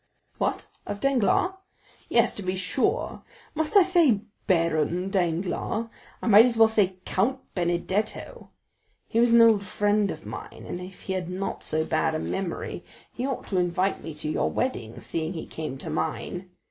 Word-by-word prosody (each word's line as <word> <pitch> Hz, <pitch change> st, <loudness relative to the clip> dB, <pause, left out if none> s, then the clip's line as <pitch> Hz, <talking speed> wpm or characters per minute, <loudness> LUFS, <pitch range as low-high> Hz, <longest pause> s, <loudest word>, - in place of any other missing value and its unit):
"What? -, -, -1 dB, 0.2 s
of 205 Hz, -, -4 dB
Danglars?" 275 Hz, -, +2 dB, 0.6 s
"Yes, -, -, +3 dB
to -, -, -6 dB
be 185 Hz, -1 st, -2 dB
sure; 265 Hz, -, -1 dB, 0.3 s
must 315 Hz, +6 st, +2 dB
I 395 Hz, -, +9 dB
say 335 Hz, -, +4 dB, 0.3 s
Baron 170 Hz, 0 st, +1 dB
Danglars? 185 Hz, +5 st, -1 dB, 0.3 s
I -, -, -2 dB
might 220 Hz, 0 st, +8 dB
as 240 Hz, -2 st, 0 dB
well 225 Hz, 0 st, +8 dB
say 205 Hz, -4 st, +2 dB
Count 235 Hz, +8 st, +1 dB, 0.2 s
Benedetto. 180 Hz, +4 st, -2 dB, 0.6 s
He 230 Hz, -, 0 dB
was 235 Hz, 0 st, +4 dB
an 235 Hz, -, +8 dB
old 220 Hz, -3 st, +5 dB
friend 205 Hz, +1 st, +1 dB
of -, -, -6 dB
mine -, -, -8 dB
and 175 Hz, -, -5 dB
if 185 Hz, +1 st, -10 dB
he 190 Hz, -, -3 dB
had 180 Hz, -2 st, -3 dB
not 190 Hz, +2 st, -3 dB
so 155 Hz, 0 st, -1 dB
bad 160 Hz, 0 st, +1 dB
a -, -, -1 dB
memory 190 Hz, 0 st, -4 dB, 0.3 s
he 250 Hz, +3 st, -2 dB
ought 270 Hz, -, -3 dB
to 190 Hz, -, +1 dB
invite 180 Hz, +2 st, 0 dB
me 160 Hz, -, -6 dB
to 150 Hz, -, -5 dB
your -, -, +1 dB
wedding, 120 Hz, -, -2 dB
seeing 160 Hz, +1 st, -3 dB
he 165 Hz, -, -5 dB
came 155 Hz, -4 st, -6 dB
to -, -, -6 dB
mine. 180 Hz, +3 st, -3 dB
190 Hz, 170 wpm, -26 LUFS, 175-225 Hz, 0.6 s, I